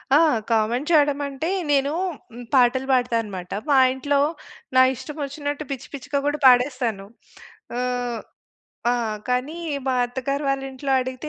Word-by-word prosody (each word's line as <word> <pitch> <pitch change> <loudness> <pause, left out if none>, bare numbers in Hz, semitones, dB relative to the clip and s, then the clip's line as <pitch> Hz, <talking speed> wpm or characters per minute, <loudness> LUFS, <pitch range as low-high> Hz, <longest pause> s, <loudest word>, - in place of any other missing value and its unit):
ఆ! - - +8 0.3
కామెంట్ 230 +6 +1
చెయడమంటే, 285 -1 +2 0.2
నేనూ 280 0 +2 0.4
హ్మ్, 245 +1 -8
పాటలు 260 0 +4
బాడతా 245 -2 +2
అనమాట. 185 -4 -8 0.2
మా 280 - +5 0.2
ఇంట్లో 280 +2 0 0.6
నా 260 - +8
ఇష్టమొచ్చినట్టు 290 +1 -5
పిచ్చి 265 -2 -5
పిచ్చిగా 280 +1 -2
కూడా 290 +1 +1
పాడేస్తాను. 250 -5 +3 0.7
ఆహ్, 245 -2 -2 0.7
ఆ! - - +3 0.4
కానీ, 250 +6 -1 0.3
మా 260 - +2
అత్తగారు 275 +4 -3
వాళ్ళింట్లో 270 0 -3
అడిగితే 260 +3 -5
265 Hz, 120 wpm, -23 LUFS, 245-285 Hz, 0.7 s, ఆ